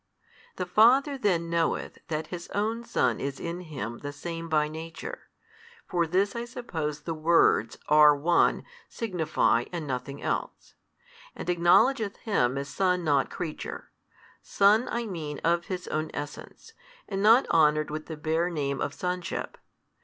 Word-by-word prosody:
The 180 - -3
Father 245 +10 +4
then 185 -9 0
knoweth 165 -1 -1
that 155 -2 -2
His 175 -1 -6
own 220 +3 -1
Son 125 - 0
is 140 0 -4
in 170 +1 -4
Him 130 -9 -6
the 145 - -6
Same 165 +3 -6
by 150 -1 +2
Nature 160 +2 -8 0.6
(for 170 -2 0
this 195 +6 +1
I 235 - -3
suppose 165 - -5
the 165 +2 -4
words, 155 -8 +3
are 150 -1 +7
One, 170 +4 +2 0.3
signify, 165 - 0
and 170 -3 -4
nothing 135 +1 -4
else), - - -4 0.6
and - - -7
acknowledgeth 200 +6 +3
Him 135 - 0
as 140 0 -3
Son 180 +2 0
not 145 -4 +2
creature; 160 -4 -6 0.5
Son 210 +4 +3
I 235 0 -2
mean 160 -8 -5
of 170 +1 +2
His 180 -1 -5
own 155 0 -2
Essence, 145 - -8 0.3
and 195 -1 -3
not 225 +6 +6
honoured 155 -1 +3
with 155 0 -5
the 160 - -6
bare 160 +3 0
name 140 -5 -2
of - - -2
Sonship. 180 -1 -3
170 Hz, 150 wpm, -27 LUFS, 150-195 Hz, 0.6 s, are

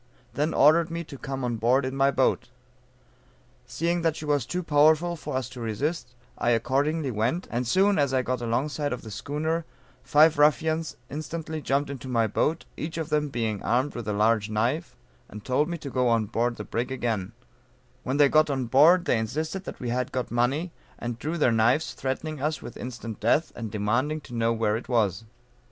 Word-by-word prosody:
then 150 +3 0
ordered 160 +4 +5
me 170 +1 -4
to 150 - -10
come 135 0 -5
on 120 -2 -1
board 125 +4 +2
in 130 +1 -3
my 135 0 +3
boat. - - +1 1.2
Seeing 170 +8 -1
that 165 -2 +1
she 155 - -7
was 145 -5 0
too 180 +5 -2
powerful 155 +3 +4
for 160 - -6
us 130 -3 -3
to 125 -2 -9
resist, 125 +4 -3 0.2
I - - +1
accordingly 135 +5 +1
went, 120 - -1
and 120 +1 -1
soon 195 - +3
as 140 -2 +2
I 130 -1 +1
got 125 0 -2
along 120 +5 0
side 145 -2 -2
of 125 - -6
the 110 - -9
schooner, 155 +9 -2 0.4
five 150 0 +4
ruffians 155 +2 +2
instantly 155 +1 -5
jumped 140 +1 0
into 135 -1 -7
my 115 -3 +2
boat, 155 +9 0
each 160 +2 -5
of 160 -1 -3
them 150 -1 +1
being 110 -5 -2
armed 130 +5 0
with 120 -3 -6
a 105 - 0
large 105 +1 +2
knife, 120 +10 -1 0.3
and 105 0 -10
told 145 +5 +1
me 170 - -3
to 140 -4 -8
go 125 -1 +1
on 115 -2 +2
board 115 +3 -1
the 105 - -6
brig 120 +4 -3
again; 115 -6 -2 0.7
when 130 +1 -2
they 145 -1 +6
got 155 +2 +4
on 135 -3 -1
board 160 +9 +5
they 120 - +2
insisted 155 - -3
that - - -7
we 125 - -4
had 125 +1 -1
got 125 -1 -3
money, 135 +9 0 0.3
and 120 -1 -5
drew 160 +6 -3
their 140 -6 +3
knives, 120 +7 +2
threatening 135 +3 -4
us 150 +2 -1
with - - -9
instant 115 -3 -7
death 135 +9 +2
and 115 -2 -5
demanding 120 +9 0
to 130 - -12
know 115 0 +1
where 110 -2 +1
it 115 - -6
was. 110 -4 +1
130 Hz, 205 wpm, -26 LUFS, 115-155 Hz, 1.2 s, they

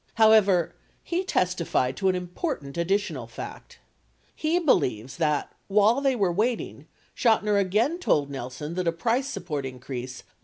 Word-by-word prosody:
However, 215 -6 +5 0.3
he 355 +2 -1
testified 175 - 0
to 190 - +2
an 185 - +1
important 180 - -4
additional 195 +5 -1
fact: - - -9 0.6
he 320 +2 +1
believes 130 - +1
that, 150 -3 0 0.2
while 210 +6 +4
they 270 -2 +2
were 195 -6 +1
waiting, 225 +5 -2 0.3
Chotiner 210 -3 +3
again 220 - +1
told 145 - +2
Nelson 135 +4 -6
that 180 0 -2
a - - +4
price 235 +10 0
support 150 - -4
increase 125 -1 -6
185 Hz, 140 wpm, -26 LUFS, 150-225 Hz, 0.6 s, However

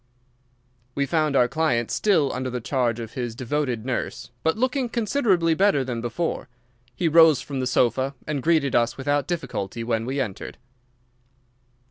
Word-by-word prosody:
We 140 - +1
found 155 0 0
our 125 -2 +5
client 125 -6 0
still 170 -10 +2
under 130 0 -3
the 125 0 -3
charge 120 -2 -1
of 115 -1 -7
his 120 -3 -4
devoted 125 -2 -2
nurse, 130 -1 -4
but 160 +5 +1
looking 255 +1 0
considerably 210 -8 +1
better 185 -5 +3
than 125 -3 -4
before. 125 +4 -3 0.5
He 165 - 0
rose 160 -3 +6
from 140 -2 -5
the 130 - -1
sofa 130 +2 +1
and 150 -3 -2
greeted 155 -3 +2
us 120 0 +2
without 145 +1 0
difficulty 120 - -4
when 115 0 -1
we 135 +2 -2
entered. 100 -8 -4
135 Hz, 155 wpm, -24 LUFS, 120-160 Hz, 0.5 s, rose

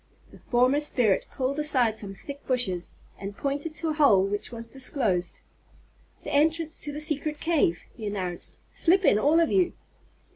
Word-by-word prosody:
The - - -15
former 255 +3 +2
spirit 245 -9 +1
pulled 270 +2 -2
aside 255 -7 +3
some 200 -3 -4
thick 280 +6 -9
bushes, 225 -9 +1 0.2
and 200 +1 -7
pointed 285 +3 -3
to 325 - -3
a - - 0
hole 250 -11 +5
which 205 +3 -4
was 230 -1 -7
disclosed. 230 - -2 0.8
"The - - -5
entrance 315 +2 +1
to 295 - -1
the 295 - -6
secret 300 0 -3
cave," 315 - +1
he 220 -3 -6
announced. 185 -4 -4
"Slip 370 +2 +3
in 205 - +5
all 300 +7 +4
of 335 - +2
you." 365 -2 +2
275 Hz, 170 wpm, -26 LUFS, 205-300 Hz, 0.8 s, hole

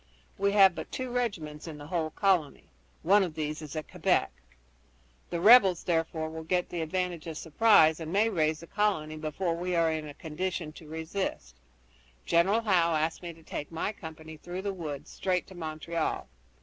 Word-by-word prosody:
We 200 0 +2
have 195 -3 +7
but - - -7
two 255 -1 -4
regiments 170 -12 -3
in 155 -2 -7
the 145 - -9
whole 160 0 -1
colony. 180 -4 +1 0.4
One 200 +5 +5
of 175 -5 -2
these 155 0 -3
is 155 0 -8
at 155 - -4
Quebec. - - +1 1.0
The 170 - -2
rebels, 195 -3 +7
therefore, 165 -2 -1
will 160 0 -6
get 180 +2 0
the 175 - -3
advantage 175 0 -2
of 160 -2 -5
surprise, 160 -2 +4
and 160 -1 -5
may 205 +4 +3
raise 155 -6 0
the - - -9
colony 180 -6 0
before 160 +3 -2
we 180 +1 -2
are 165 -1 +3
in 155 -1 -3
a 145 - -10
condition 170 0 -4
to 160 - -13
resist. 160 - -4 0.7
General 190 +7 +3
Howe 175 -6 +3
asked 155 +1 -1
me 175 -1 -6
to 165 0 -19
take 145 - -6
my 165 +5 -2
company 160 -5 -10
through 175 +4 -6
the 200 -1 -2
woods 150 -4 -6
straight 180 -2 -1
to 190 - -13
Montreal. 160 -1 -3
165 Hz, 185 wpm, -29 LUFS, 155-185 Hz, 1.0 s, have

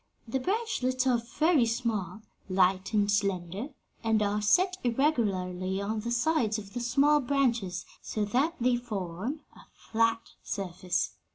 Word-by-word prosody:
The 265 +4 -1
branchlets 265 - 0
are 245 -3 +3 0.2
very 310 -6 +4
small, 220 -4 -2 0.3
light 185 +1 +2
and 210 -2 +3
slender, 195 +1 -1 0.4
and 225 -1 +2
are 205 +1 0
set 365 - +3
irregularly 195 -8 0
on 215 +2 -2
the 230 +3 -4
sides 235 -3 +1
of 200 -2 -9
the 245 - -3
small 280 +5 +3
branches; 240 -10 0 0.2
so 210 -1 -2
that 270 +10 +1
they 245 0 +3
form 215 - -4
a - - -14 0.2
flat 230 0 0
surface. 180 -2 -2
225 Hz, 135 wpm, -29 LUFS, 195-255 Hz, 0.4 s, very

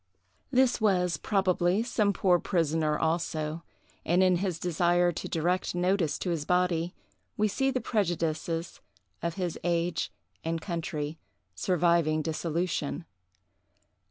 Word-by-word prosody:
This 255 -3 +3
was, 180 -4 +2
probably, 190 0 +1
some 215 -4 +1
poor 180 -2 +3
prisoner 160 -4 +1
also; 160 -1 -1 0.4
and 175 +3 +3
in 185 -1 +4
his 185 -2 -1
desire 175 +1 +2
to 165 - -5
direct 175 +3 0
notice 180 -2 +1
to 180 - -2
his 160 -3 -1
body, 180 0 +1 0.4
we 215 - +3
see 270 +6 +1
the 260 -2 -1
prejudices 165 -4 -1 0.4
of 170 0 -2
his 180 -4 -3
age 170 0 0 0.3
and 165 0 -1
country 160 -3 -4 0.3
surviving 165 - +2
dissolution. 165 0 -2
175 Hz, 120 wpm, -29 LUFS, 165-185 Hz, 0.4 s, in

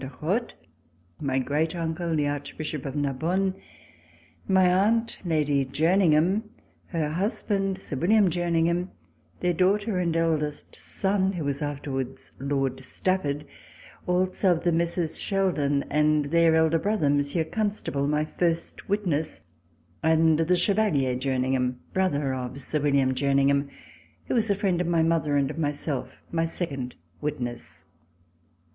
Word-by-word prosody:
de 130 - -5
Rothe, 205 +10 -1 0.7
my 135 -3 -1
great 150 +5 0
uncle, 165 0 -2
the 150 -1 +1
Archbishop 145 0 -4
of 135 - -5
Narbonne, 160 +7 0 0.9
my 190 -1 +4
aunt, 215 +6 +2
Lady 150 -5 +1
Jerningham, 165 +5 +3 0.5
her 160 -4 -1
husband, 195 +1 -1
Sir 150 -7 -5
William 195 +4 +4
Jerningham, 170 +1 +1 0.5
their 180 0 +2
daughter 195 +3 +1
and 170 -2 0
eldest 155 -3 -1
son, 195 -1 0
who 170 -4 -3
was 140 +1 -2
afterwards 140 -3 -4
Lord 135 -1 -1
Stafford; 150 -2 -1 0.6
also 185 +1 +2
of 165 - -4
the 175 - +2
Messieurs 170 0 0
Sheldon, 155 -8 +1
and 150 0 +3
their 165 -1 +5
elder 160 0 +3
brother 205 -4 0
Monsieur 145 +3 +1
Constable, 200 -7 -2
my 150 +1 +1
first 170 +2 -2
witness, 170 -7 -1 0.6
and 160 0 +4
the 175 +3 +3
Chevalier 175 -10 +2
Jerningham, 130 -1 0 0.2
brother 145 -8 +1
of 130 +1 -5
Sir 150 +3 -2
William 140 -2 +2
Jerningham, 140 +1 +2 0.6
who - - -2
was 225 -3 +2
a 200 - +3
friend 190 -3 0
of 180 - -1
my 170 -1 +3
mother 160 -3 +1
and 140 0 +1
of 160 - -7
myself, 145 -3 -2 0.2
my 165 -1 +1
second 140 -7 -4 0.3
witness. 120 -5 -5
160 Hz, 135 wpm, -26 LUFS, 140-180 Hz, 0.9 s, their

